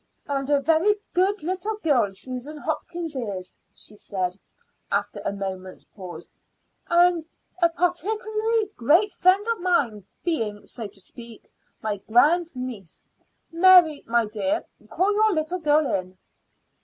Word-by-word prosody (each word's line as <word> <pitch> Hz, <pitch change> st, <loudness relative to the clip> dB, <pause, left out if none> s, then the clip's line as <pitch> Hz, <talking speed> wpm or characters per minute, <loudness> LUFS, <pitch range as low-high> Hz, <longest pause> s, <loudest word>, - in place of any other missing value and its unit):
"And 275 Hz, -1 st, -2 dB
a 290 Hz, -1 st, +4 dB
very 325 Hz, +8 st, +3 dB, 0.2 s
good 380 Hz, +1 st, +1 dB
little 375 Hz, +5 st, -2 dB
girl 275 Hz, -, +2 dB
Susan 255 Hz, +9 st, -6 dB
Hopkins 325 Hz, +1 st, -4 dB
is," 200 Hz, -7 st, -5 dB, 0.2 s
she 210 Hz, -, -10 dB
said, 185 Hz, -2 st, -3 dB, 0.5 s
after -, -, -1 dB
a -, -, -1 dB
moment's 190 Hz, -2 st, -6 dB
pause; 185 Hz, -3 st, -9 dB, 0.6 s
"and 345 Hz, -2 st, +3 dB, 0.3 s
a 340 Hz, -, +5 dB
particularly 430 Hz, +5 st, 0 dB
great 335 Hz, -, +3 dB
friend 375 Hz, +4 st, +3 dB
of 465 Hz, -1 st, 0 dB
mine, 260 Hz, -, 0 dB, 0.2 s
being, 220 Hz, -12 st, -2 dB
so 230 Hz, -3 st, -6 dB
to 200 Hz, 0 st, -18 dB
speak, 230 Hz, +4 st, -10 dB, 0.3 s
my 215 Hz, -2 st, -1 dB
grand 300 Hz, -, +3 dB
niece. 240 Hz, -9 st, -6 dB, 0.5 s
Mary, 340 Hz, -3 st, +6 dB
my 235 Hz, 0 st, +2 dB
dear, 255 Hz, +10 st, -1 dB, 0.2 s
call 395 Hz, +3 st, +1 dB
your 430 Hz, 0 st, +3 dB
little 315 Hz, +4 st, -1 dB
girl 305 Hz, -1 st, +3 dB
in." 185 Hz, -6 st, -3 dB
300 Hz, 130 wpm, -24 LUFS, 215-360 Hz, 0.6 s, Mary